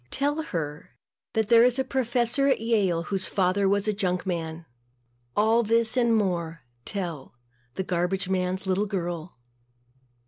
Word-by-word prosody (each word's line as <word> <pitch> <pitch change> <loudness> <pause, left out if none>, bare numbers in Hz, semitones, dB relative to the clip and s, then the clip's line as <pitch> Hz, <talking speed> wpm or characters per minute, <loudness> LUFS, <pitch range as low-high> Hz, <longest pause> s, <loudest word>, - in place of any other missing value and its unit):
Tell 290 - 0
her 150 - -5 0.4
that 220 -2 0
there 235 -1 +7
is 250 +1 +3
a 265 - +1
professor 250 +1 +1
at 275 - +3
Yale 205 -7 +1
whose 190 +1 -1
father 195 +1 +1
was 200 +1 +1
a 215 - +2
junk 185 -3 -1
man. 165 -2 -4 0.7
All 220 +3 +4
this 230 +1 +2
and 235 -2 +3
more 170 -6 -1 0.2
tell 170 -11 -4 0.4
the 190 - -2
garbage 180 +1 -1
man's 185 0 -1
little 190 +2 +1
girl. 175 -5 -4
195 Hz, 145 wpm, -26 LUFS, 180-230 Hz, 0.7 s, there